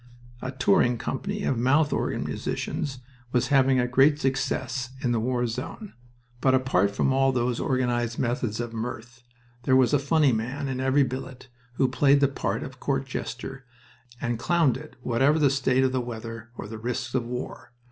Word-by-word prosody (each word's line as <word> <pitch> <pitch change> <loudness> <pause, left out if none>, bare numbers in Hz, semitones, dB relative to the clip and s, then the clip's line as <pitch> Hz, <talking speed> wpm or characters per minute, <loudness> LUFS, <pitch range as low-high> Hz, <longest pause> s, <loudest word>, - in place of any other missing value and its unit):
A 130 - -3
touring 130 -1 +3
company 200 - -3
of 125 - 0
mouth 145 +5 +3
organ - - -1
musicians 135 -4 -3 0.3
was 125 0 +1
having 135 -2 +4
a 125 - +2
great 135 +4 +4
success 130 -2 -1
in 125 - +1
the 120 - +1
war 125 +1 0
zone. 130 - -5 0.5
But, 130 +1 +4
apart 130 -7 +2
from 100 +6 +1
all 135 0 +3
those 120 -1 0
organized 120 -2 0
methods 120 -3 -1
of 120 -1 -4
mirth, 115 +1 -6 0.4
there 130 +2 +3
was 130 +1 +4
a 145 - +5
funny 145 0 +3
man 125 +5 -2
in 130 -1 -3
every 135 +2 +3
billet 130 0 -6 0.2
who 130 +2 +2
played 135 +2 +4
the 140 - +4
part 135 - -2
of 130 -1 -9
court 135 0 -1
jester, 135 0 -6 0.5
and 120 -1 -2
clowned 145 +3 +2
it 150 +4 -9
whatever 135 +6 +3
the 145 -4 +4
state 130 -1 +2
of 130 - +2
the 130 -1 0
weather 115 -1 -7
or - - -6
the 110 +1 -7
risks 120 +1 -3
of 120 -3 0
war. 125 0 -6
130 Hz, 180 wpm, -26 LUFS, 120-135 Hz, 0.5 s, a